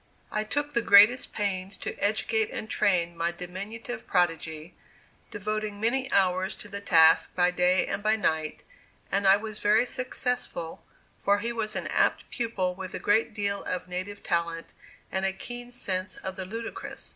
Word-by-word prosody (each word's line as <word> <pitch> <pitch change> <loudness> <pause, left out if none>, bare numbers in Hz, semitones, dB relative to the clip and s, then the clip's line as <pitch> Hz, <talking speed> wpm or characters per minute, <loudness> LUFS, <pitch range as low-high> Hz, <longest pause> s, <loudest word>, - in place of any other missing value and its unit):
I 215 - 0
took 290 +6 -2
the 235 - +2
greatest 225 +4 +6
pains 195 -2 -2
to - - -5
educate 220 +1 +1
and 220 - -5
train 175 -5 +1
my 170 +1 0
diminutive 200 +7 -7
prodigy, 165 -2 0 0.6
devoting 215 0 -3
many 260 +5 0
hours 185 0 +2
to - - -10
the 200 0 -6
task 165 -4 +5
by 180 0 +3
day 180 +1 +3
and - - -3
by 215 +1 +3
night, 160 -7 -1 0.5
and 200 0 +2
I 195 +1 +7
was 215 0 -6
very 215 +4 +4
successful, 250 -9 -3 0.4
for 200 0 +3
he 230 +3 -2
was 220 -2 -2
an - - -2
apt - - +1
pupil 215 -7 -1
with 185 0 -7
a - - -1
great 215 +1 +2
deal 200 -1 -1
of 180 0 -3
native 185 +3 -5
talent, 170 -1 -2 0.4
and 190 - -1
a 195 - +2
keen 240 +5 -8
sense 190 -6 -3
of 190 0 -6
the 190 -1 -5
ludicrous. 225 +4 -7
200 Hz, 170 wpm, -27 LUFS, 180-220 Hz, 0.6 s, I